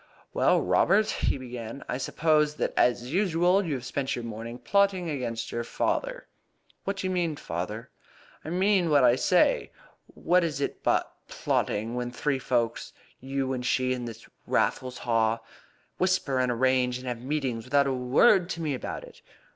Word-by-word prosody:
"Well, - - +3
Robert," 215 +2 +3
he - - 0
began, 125 -1 -7
"I 125 - -3
suppose 150 +1 +1
that, - - -2
as 125 +2 +1
usual, 180 0 +3
you 160 -6 -2
have 125 -2 -6
spent 140 +1 -2
your 120 - -5
morning 115 +1 -6
plotting 190 +4 +1
against 120 -5 -4
your 120 - -2
father?" - - -2 0.6
"What 195 0 -2
do 190 - -4
you 185 - 0
mean, 170 -4 0
father?" 105 +1 -5 0.5
"I - - -6
mean 185 0 +2
what 145 -3 +5
I 120 - +6
say. - - +2 0.4
What 180 +1 +1
is 155 -4 -2
it 140 - -3
but - - +1
plotting 110 +3 -1
when 125 0 -2
three 135 +2 -1
folk 120 -3 0 0.4
you 135 0 -2
and 125 -1 -3
she 130 0 +1
and 125 -1 -4
this 115 -1 -10 0.2
Raffles 125 -1 0
Haw 115 -1 +1 0.6
whisper 180 -8 +1
and 125 -1 +1
arrange 125 0 +2
and 130 - -10
have 120 -2 -4
meetings 130 -4 -2
without 140 +2 +3
a 135 - 0
word 150 - +4
to 170 - -4
me 155 -3 -1
about 130 - -5
it? - - -14
130 Hz, 170 wpm, -27 LUFS, 120-165 Hz, 0.6 s, I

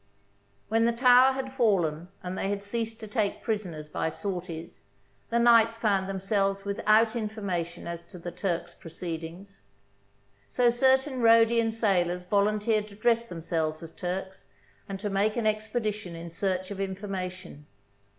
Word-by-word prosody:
When 225 +1 +2
the 235 - +2
tower 250 +2 +6
had 260 0 -5
fallen 175 - +1 0.2
and 180 +1 -4
they 195 - -2
had 200 0 -2
ceased 225 +2 -3
to 215 - -6
take 210 -2 -1
prisoners 180 -9 -3
by 155 - -2
sorties, 175 -2 -6 0.5
the 235 - +1
knights 230 -1 +5
found 200 -4 +1
themselves 195 0 0
without 215 +3 +3
information 200 -7 -3
as 170 0 -5
to 180 - -11
the 175 0 -6
Turks' 175 -1 -3
proceedings; 170 +3 -8 0.9
so 245 -1 +3
certain 265 +1 +2
Rhodian 230 0 +5
sailors 180 -5 +1
volunteered 210 +2 +1
to 200 - -13
dress 230 +2 +1
themselves 160 -2 -2
as 165 - -9
Turks 190 +2 -5 0.4
and 195 -1 -4
to 205 - -3
make 205 +2 +1
an 235 - 0
expe 215 +2 -1
dition 210 -5 -3
in 170 0 -8
search 185 +2 -2
of 200 - -6
information. 185 -5 -5
200 Hz, 150 wpm, -28 LUFS, 180-225 Hz, 0.9 s, tower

